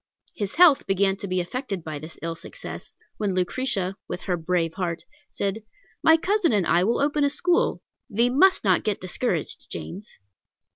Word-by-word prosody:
His 205 -3 -4
health 325 -5 +6
began 195 0 +2
to 200 - -6
be 185 0 0
affected 195 - -4
by 155 -2 -5
this 155 +2 -10
ill 165 0 -2
success, - - -9 0.2
when 200 -3 -1
Lucretia, 195 0 -1
with 180 - -5
her 180 - -1
brave 165 -1 -1
heart, 170 -3 -3 0.3
said, 200 +2 -2 0.4
"My 320 0 +6
cousin 390 0 +1
and 205 -5 +2
I 170 +2 +3
will 230 +5 +1
open 290 +1 +1
a 285 - +4
school; 350 +5 +1 0.3
thee 235 +4 +2
must 375 +9 +4
not 185 -4 +3
get 210 -2 -1
discouraged, 185 +7 -2
James." 200 +4 -8
200 Hz, 175 wpm, -25 LUFS, 180-265 Hz, 0.4 s, health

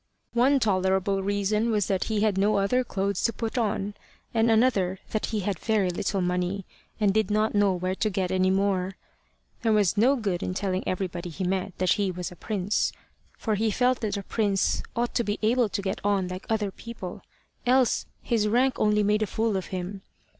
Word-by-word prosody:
One 260 +4 +4
tolerable 190 -2 +1
reason 205 +3 0
was 210 -4 +2
that 190 -2 0
he 215 -2 0
had 215 -2 +2
no 205 +2 +2
other 225 +6 +2
clothes 200 -4 -2
to 230 - +3
put 225 0 -4
on, 205 -4 -1 0.4
and 225 0 +3
another 220 -5 +3
that 215 - -1
he 215 -2 -2
had 195 -2 -2
very 210 -5 +1
little 190 +2 -1
money, 180 +2 -1 0.3
and 205 -2 +3
did 220 0 +1
not 215 +1 +1
know 205 -2 +3
where 185 +1 -1
to 215 +3 0
get 185 -2 -1
any 185 0 +2
more. 190 -1 +1 0.7
There 225 -2 +2
was 205 -2 +2
no 250 +7 +5
good 200 -8 -2
in 185 - -3
telling 190 -1 -1
everybody 180 -2 -3
he 180 +4 -5
met 185 +1 -2
that 185 -1 +1
he 200 -2 0
was 180 -1 -4
a - - -10
prince, 200 +1 -1 0.5
for 220 - -1
he 220 +2 +1
felt 250 +4 +2
that 210 -2 -2
a 200 - -4
prince 200 -2 +1
ought 240 0 -1
to 235 - +1
be 205 -1 -2
able 235 +1 +3
to 200 - -2
get 190 - -2
on 200 -2 +1
like 185 +1 -7
other 215 -3 0
people, 205 -5 -8 0.5
else 255 -1 +3 0.2
his 220 -3 +1
rank 250 +4 +2
only 210 0 +3
made 210 +1 +2
a 215 - +1
fool 220 +1 0
of 190 - -2
him. 190 +1 -5
205 Hz, 205 wpm, -26 LUFS, 190-220 Hz, 0.7 s, no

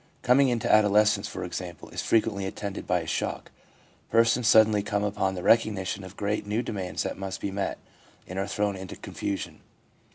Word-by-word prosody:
Coming 130 +2 +5
into 120 -3 -1
adolescence, 105 -1 +4
for 95 - -6
example, 90 -1 -6
is - - -4
frequently 105 -4 +1
attended 100 0 -6
by - - +2
a - - -7
shock; - - -3 0.6
persons 115 +1 +3
suddenly 110 -2 +6
come 100 0 -1
upon 95 -2 -1
the 90 - -5
recognition 100 -4 +2
of 95 +2 -11
great, 105 0 -2
new 110 +4 0
demands 95 -6 -3
that - - -4
must 95 0 -4
be 100 - -3
met, 100 0 -2 0.5
and 95 +1 -5
are 95 - -1
thrown 105 -1 -1
into 95 -1 -8
confusion. 100 -1 -5
100 Hz, 175 wpm, -27 LUFS, 95-110 Hz, 0.6 s, suddenly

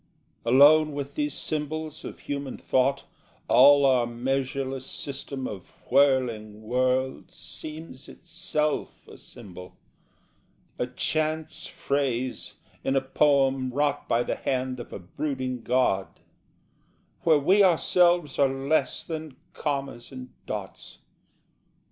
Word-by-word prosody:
Alone 145 +5 +6
with 140 0 -5
these 150 -1 -2
symbols 155 0 -4
of - - -8
human 140 -2 -5
thought, 135 +2 +1 0.4
All 140 +2 +7
our 125 -3 +3
measureless 135 +2 -2
system 140 -1 -5
of 95 -4 -9 0.2
whirling 120 -6 +2
worlds 130 +3 -1
Seems 155 -3 -9
itself 165 -3 -3
a - - -12
symbol, 90 -1 -12 1.0
a 125 - 0
chance 155 +4 -2
phrase 130 -3 -2 0.3
In 135 - 0
a 135 - +3
poem 135 -1 +2
wrought 145 +3 0
by 120 +1 +2
the - - -3
hand 130 -1 -2
of 120 - -9
a - - -5
brooding 130 - -4
god, 120 -6 +1 1.1
Where 160 -2 +5
we 190 +8 +4
ourselves 175 -2 +3
are 140 -1 +5
less 135 +1 0
than 155 -4 -6 0.2
commas 140 -5 -4
and 130 -1 -9 0.2
dots. - - -7
135 Hz, 110 wpm, -26 LUFS, 130-150 Hz, 1.1 s, All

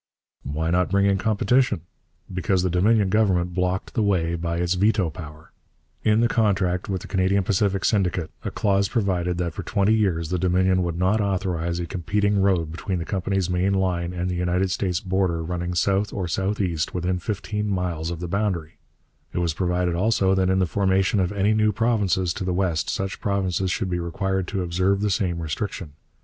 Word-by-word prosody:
' - - -69
Why 80 +4 -2
not 90 +1 +2
bring 100 +1 +2
in 100 -1 +2
competition? 110 -1 +2 0.5
Because 90 0 +1
the 90 - 0
Dominion 100 +3 +3
Government 95 -4 +2
blocked 90 +1 -1
the 115 - 0
way 90 -5 +1
by 85 0 -2
its 85 +1 +1
veto 95 -2 +2
power. 75 -1 -11 0.5
In 110 +1 +3
the 120 - +4
contract 95 -6 +1
with 95 -2 -2
the - - -9
Canadian 95 +1 +1
Pacific 95 0 +1
Syndicate 90 -6 0
a - - -2
clause 100 -1 +1
provided 90 -6 0
that 85 -2 -2
for - - -5
twenty 105 0 +1
years 90 -7 +1
the 90 0 -1
Dominion 95 +1 +2
would 85 -2 -2
not 95 +5 +2
authorize 90 -4 -1
a 85 - -2
competing 100 +3 0
road 90 -5 +1
between 90 +3 -3
the 85 - -4
company's 95 0 -1
main 90 +2 +1
line 90 -2 0
and 90 0 -3
the 90 - -2
United 90 +2 0
States 90 -3 -1
border 95 -3 0
running 90 +1 -3
south 100 +3 +1
or 95 -3 -3
southeast 95 -3 -1
or - - -22
within 90 +1 -1
fifteen 105 +1 -3
miles 90 -4 -2
of 85 -2 -5
the 90 - -4
boundary; 90 -4 -2 0.5
it - - -4
was 85 -2 +1
provided 90 0 0
also 95 +1 +2
that 95 -1 +2
in 95 - +2
the 95 - +3
formation 95 +3 +1
of 90 0 +1
any 100 +1 +2
new 110 0 +3
provinces 100 -5 +1
to - - -5
the 90 -1 -1
west 90 -4 0
such 95 -1 -3
provinces 95 -2 0
should 95 0 -2
be 90 - 0
required 95 +2 -2
to 95 -2 -2
observe 95 +3 +1
the 105 -1 +1
same 90 -4 0
restriction. 80 +1 -4
95 Hz, 195 wpm, -24 LUFS, 90-100 Hz, 0.5 s, the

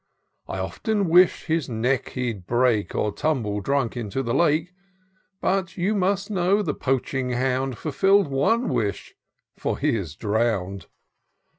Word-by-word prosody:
I - - -4
often 210 -5 -1
wish'd 180 +2 +5
his 160 -4 -1
neck 125 +3 -1
he'd 115 -8 -3
break. 120 -3 +1
Or 105 - 0
tumble 115 -8 -1
drunk 135 +1 0
into 120 +2 -3
the 115 -1 -2
Lake; 165 +1 +2 0.7
So, 190 -1 +1
you 185 +4 0
must 200 +1 0
know 195 +2 +2
the - - -1
poaching 130 -1 -1
hound 130 +1 0
FulfiD'd 195 - +3
one 145 - +1
wish 100 -3 -2 0.2
— - - -37
^for - - -1
he - - +1
is 85 -8 -4
drown'd. 100 -4 -1
135 Hz, 145 wpm, -24 LUFS, 115-180 Hz, 0.7 s, wish'd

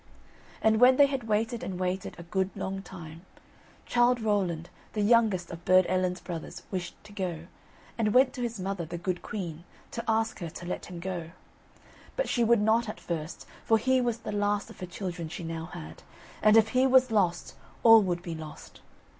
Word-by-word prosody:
And 220 0 +4
when 250 +1 +7
they 285 - +8
had 270 -5 -3
waited 225 +2 0
and 185 -2 -5
waited 185 +1 -2
a 170 - -8
good 190 +2 -1
long 195 0 -4
time, 165 -3 -10 0.6
Childe 240 0 +3
Rowland, 185 -6 -1 0.2
the 210 - 0
youngest 210 -6 +3
of 170 0 -8
Burd 185 0 +5
Ellen's 185 -1 0
brothers, 175 0 -7
wished 180 -3 -4
to 210 0 -14
go, 175 -5 -4 0.5
and 215 -2 +2
went 255 +3 +5
to 250 - -6
his 235 -3 -3
mother, 190 -1 -3
the 170 +2 -6
good 180 +1 -3
queen, 170 -5 -5 0.3
to 235 - -4
ask 225 0 +1
her 170 -3 -4
to 175 - -9
let 180 - -4
him 175 -1 -8
go. 175 -2 -4 0.9
But - - 0
she 240 - +1
would 230 -1 +4
not 220 +1 +2
at - - -6
first, 165 -1 -5 0.2
for 225 - +4
he 260 +3 +2
was 240 -2 0
the 215 - -6
last 205 0 0
of - - -15
her 180 - -5
children 175 -2 -5
she 175 - -6
now 165 0 -4
had, 80 - -9 0.4
and 215 +1 +6
if 220 0 +5
he 255 +2 +3
was 260 -1 +5
lost, 180 -5 +1 0.3
all 225 -1 +9
would 175 -3 -2
be 170 - -5
lost. 160 -1 -10
195 Hz, 195 wpm, -28 LUFS, 175-225 Hz, 0.9 s, all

